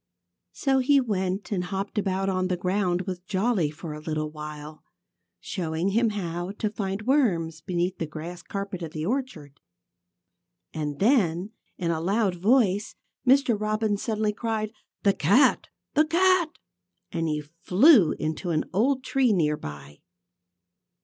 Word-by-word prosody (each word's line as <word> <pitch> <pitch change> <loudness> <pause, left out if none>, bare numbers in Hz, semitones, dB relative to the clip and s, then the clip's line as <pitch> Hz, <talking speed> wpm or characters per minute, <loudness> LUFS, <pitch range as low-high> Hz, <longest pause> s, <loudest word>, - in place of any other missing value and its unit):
So 270 -2 +1
he 275 +2 +4
went 195 -5 -2
and 180 -3 -1
hopped 195 +3 -3
about 195 -1 -1
on 185 -1 0
the 180 -1 -1
ground 180 0 0
with 185 -1 -6
Jolly 195 -5 +1
for 155 +1 -7
a 150 - -7
little 155 -1 -3
while, 150 0 -8 0.6
showing 170 -1 -2
him 230 +3 +2
how 175 -2 -4
to 210 0 -2
find 195 -1 -3
worms 180 - +1
beneath 180 0 -2
the 165 - -2
grass 170 +3 -7
carpet 195 -1 -5
of 165 -2 -6
the 155 0 -3
orchard. 185 - -4 1.1
And 150 -2 -3
then, 195 - +2 0.3
in 170 -2 -1
a 160 -1 -2
loud 200 +2 +1
voice, 205 +1 +2 0.3
Mr. 260 -2 +5
Robin 215 0 0
suddenly 215 0 -1
cried: 220 -1 -2 0.3
"The 200 - +4
cat! 200 - +3 0.3
The 305 +1 +4
cat!" 355 -1 +3 0.5
And 165 -1 -1
he 150 -1 -1
flew 180 - +4
into 155 +3 -3
an 155 -2 0
old 255 +7 +2
tree 260 -2 +2
near 155 -6 +2
by. 75 - -9
190 Hz, 145 wpm, -26 LUFS, 165-220 Hz, 1.1 s, Mr